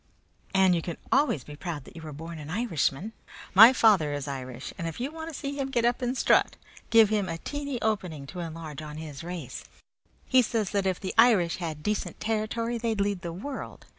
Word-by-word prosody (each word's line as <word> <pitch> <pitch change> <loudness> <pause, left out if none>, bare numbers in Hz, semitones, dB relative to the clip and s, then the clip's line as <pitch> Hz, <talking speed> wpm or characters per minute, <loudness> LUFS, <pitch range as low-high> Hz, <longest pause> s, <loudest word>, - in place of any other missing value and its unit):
"And 190 -1 +5
you 170 - +1
can 170 0 -5
always 275 - +3
be 150 - -10
proud 155 -2 -5
that - - -15
you 165 - -8
are - - -6
born 165 +3 -8
an 150 0 -8
Irishman. 200 - -1 0.4
My 220 +6 +10
father 205 - +4
is 145 0 -4
Irish, 130 -2 -6
and 165 - -4
if 165 - -6
you 265 +4 -2
want 320 +1 -6
to 300 - -7
see 280 -1 -3
him 275 -1 -2
get 240 -3 +1
up 240 +2 +1
and 250 +1 -1
strut - - +3 0.3
give 225 -2 +6
him 205 -4 0
a 165 - -3
teeny 285 - -4
opening 180 -10 -1
to 180 +6 -8
enlarge 160 -3 -6
on 150 0 -8
his 155 -2 -7
race. 170 -7 -6 0.6
He 260 0 +5
says 225 -4 -1
that 200 -2 +1
if 185 -2 0
the 190 - -4
Irish 210 -8 +5
had 160 -4 -5
decent 210 -1 -2
territory 225 +2 -1
they'd 225 -2 -1
lead 200 -2 0
the 170 -2 -4
world. 260 +11 -7
190 Hz, 215 wpm, -28 LUFS, 160-230 Hz, 0.6 s, My